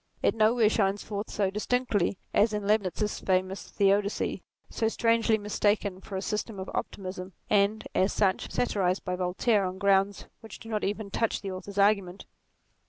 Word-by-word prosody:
It - - +3
nowhere 220 +1 +4
shines 200 -2 +1
forth 205 0 -5
so 195 -2 0
distinctly 210 -3 0 0.2
as 215 +1 +3
in 210 -1 -2
Leibnitz's 210 0 0
famous 185 +1 -1
Theodicee, 200 0 +1 0.3
so 225 - -1
strangely 230 0 +2
mistaken 205 -2 0
for 195 - -8
a 190 - -4
system 210 -1 -3
of 190 - -6
optimism, 185 -1 -5 0.2
and, 205 +1 +2
as 190 +2 +2
such, 190 -3 +1
satirized 190 -6 0
by 180 -1 -1
Voltaire 185 +4 +1
on 185 0 -3
grounds 195 0 +2
which 225 - -11
do 225 - -12
not 215 -2 -2
even 205 0 -3
touch 225 +2 0
the 195 - -4
author's 195 +2 -8
argument. 200 -2 +2
200 Hz, 165 wpm, -28 LUFS, 190-215 Hz, 0.3 s, nowhere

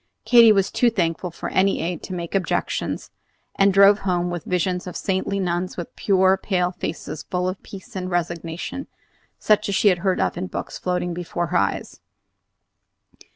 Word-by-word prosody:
Katy 235 -3 +8
was 195 -2 +2
too 245 - +3
thankful 175 -4 -1
for 170 - -6
any 195 +1 +2
aid 170 -1 -3
to 185 - -6
make 170 -1 -5
objections, 195 -2 -2 0.4
and 195 0 +4
drove 200 +2 +6
home 180 -2 -1
with 175 -2 -5
visions 180 0 -1
of 180 - -5
saintly 195 +1 -1
nuns 180 0 -2
with 175 - -7
pure 190 -1 +3
pale 180 -3 0
faces 155 -3 -5
full 180 +2 -2
of 185 +1 -4
peace 195 -1 -12
and 185 -1 -3
resignation, 175 - -3 0.5
such 215 -1 +2
as 200 - 0
she 205 - +5
had 180 -2 0
read 190 -2 +1
of - - 0
in 185 - -3
books, - - -6
floating 180 -1 -1
before 175 0 -3
her - - +4
eyes. - - -2
180 Hz, 175 wpm, -23 LUFS, 175-195 Hz, 0.5 s, Katy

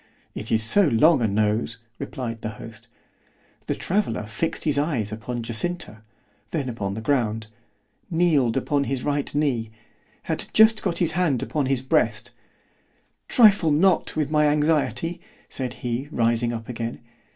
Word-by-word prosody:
—It 110 - -6
is 110 -1 +3
so 185 - +4
long 140 +3 +4
a 115 - +2
nose, 110 +2 0 0.2
replied 125 -5 -5
the 110 - -3
host.——The 115 +1 -11
traveller 180 - -1
fixed 110 +10 -3
his 145 -2 +1
eyes 130 -9 -1
upon 115 +2 -5
Jacinta, 115 0 -3 0.5
then 145 -6 -2
upon 100 -5 -4
the 110 - -5
ground—kneeled 115 - -1
upon 140 +1 0
his 135 -2 -2
right 145 -1 -1
knee—had 115 -7 -4
just 220 0 +6
got 180 -4 -1
his 170 -2 +1
hand 160 -7 +1
laid - - -7
upon 145 -4 0
his 130 -1 0
breast——Trifle 200 - 0
not 170 +4 +2
with 150 -2 -1
my 150 -1 +4
anxiety, 155 +3 0 0.3
said 130 -2 -3
he 120 +3 -2
rising 115 -1 +1
up 115 -1 -6
again. 115 -1 -5
130 Hz, 140 wpm, -24 LUFS, 115-155 Hz, 0.5 s, just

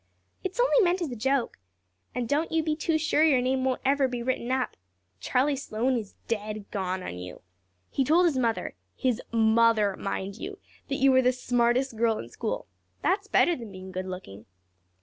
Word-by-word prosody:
"It's 380 +5 -4
only - - +4
meant 360 -1 +3
as 305 - -3
a - - -4
joke. 265 - 0 0.6
And 245 -2 -1
don't 295 +5 0
you 320 -1 +2
be 310 -1 0
too 315 +1 +1
sure 310 0 +2
your 295 -5 +5
name 260 +1 0
won't 260 -1 0
ever 275 0 +3
be 245 -2 -4
written 255 -1 -1
up. 260 -1 0 0.4
Charlie 265 - +1
Sloane 255 -1 -1
is 215 -4 -5
dead 215 -2 -3
gone 185 -2 -2
on 90 - -6
you. 90 0 -9 0.5
He 275 - +1
told 330 +7 +4
his 325 -5 +2
mother 235 -3 0 0.2
his 250 -3 0
mother, 220 -2 +4
mind 195 0 -4
you 395 - -6 0.3
that 275 - -2
you 270 0 +4
were 260 0 +5
the 250 0 +4
smartest 245 0 +1
girl 225 -1 +2
in - - -7
school. - - -3 0.4
That's 395 +2 +1
better 350 -4 +4
than 230 -6 -9
being 185 0 -9
good 185 0 -4
looking." 145 - -8
250 Hz, 190 wpm, -27 LUFS, 215-280 Hz, 0.6 s, your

